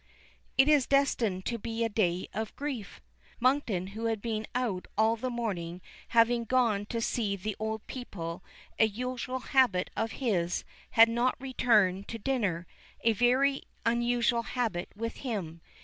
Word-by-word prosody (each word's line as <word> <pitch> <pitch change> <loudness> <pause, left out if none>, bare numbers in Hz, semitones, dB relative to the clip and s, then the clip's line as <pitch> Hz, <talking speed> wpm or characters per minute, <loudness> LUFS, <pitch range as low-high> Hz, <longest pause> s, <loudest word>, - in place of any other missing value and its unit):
It 270 +1 +6
is 295 -4 +4
destined 235 -9 +2
to 235 -1 -2
be 230 +1 -2
a - - +2
day 185 -5 0
of 220 +2 -4
grief! 270 -8 -5 0.4
Monkton 240 -8 +1
who 225 +2 -4
had 225 -1 0
been 220 0 -3
out 230 -8 -1
all 220 +1 +4
the 255 +3 -3
morning, 185 -8 -3 0.3
having 235 0 +4
gone 225 -4 +1
to 230 - -2
see 220 -3 0
the 200 +2 -4
old 220 0 -3
people, 170 -10 -6 0.4
a 220 - +6
usual 250 +3 -4
habit 240 -9 +4
of 225 0 -1
his, 180 -9 0 0.3
had 225 0 +7
not 240 +3 +1
returned 215 -7 +2
to 230 - -5
dinner 200 -8 -1 0.4
a 230 - +3
very 255 +5 +3 0.2
unusual 235 0 +2
habit 225 -7 -2
with 230 +2 -4
him. 185 - -4
230 Hz, 150 wpm, -30 LUFS, 200-245 Hz, 0.4 s, had